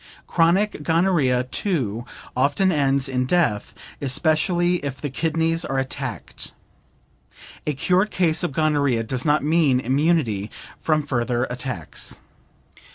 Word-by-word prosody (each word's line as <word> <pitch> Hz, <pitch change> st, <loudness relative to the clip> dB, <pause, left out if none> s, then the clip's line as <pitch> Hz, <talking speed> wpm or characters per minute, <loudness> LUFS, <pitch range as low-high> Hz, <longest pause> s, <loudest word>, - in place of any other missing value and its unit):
Chronic 175 Hz, +2 st, +2 dB
gonorrhea, 160 Hz, -6 st, +2 dB
too, 125 Hz, -, -2 dB, 0.3 s
often 145 Hz, +9 st, +2 dB
ends 140 Hz, -3 st, +2 dB
in 125 Hz, -1 st, -1 dB
death, 150 Hz, -, +1 dB, 0.3 s
especially 170 Hz, +5 st, +2 dB
if 140 Hz, -4 st, -5 dB
the 145 Hz, -, -4 dB
kidneys 165 Hz, +3 st, 0 dB
are 135 Hz, -, -2 dB
attacked. 135 Hz, 0 st, -4 dB, 1.1 s
A 150 Hz, -, 0 dB
cured 185 Hz, +8 st, +2 dB
case 170 Hz, -6 st, +1 dB
of 175 Hz, -, -1 dB
gonorrhea 140 Hz, -5 st, +1 dB
does 125 Hz, +3 st, -3 dB
not 150 Hz, -1 st, +3 dB
mean 150 Hz, -4 st, +3 dB
immunity 130 Hz, -, +1 dB, 0.3 s
from 155 Hz, -1 st, +1 dB
further 120 Hz, -3 st, 0 dB
attacks. 125 Hz, -, -4 dB
145 Hz, 115 wpm, -23 LUFS, 130-165 Hz, 1.1 s, not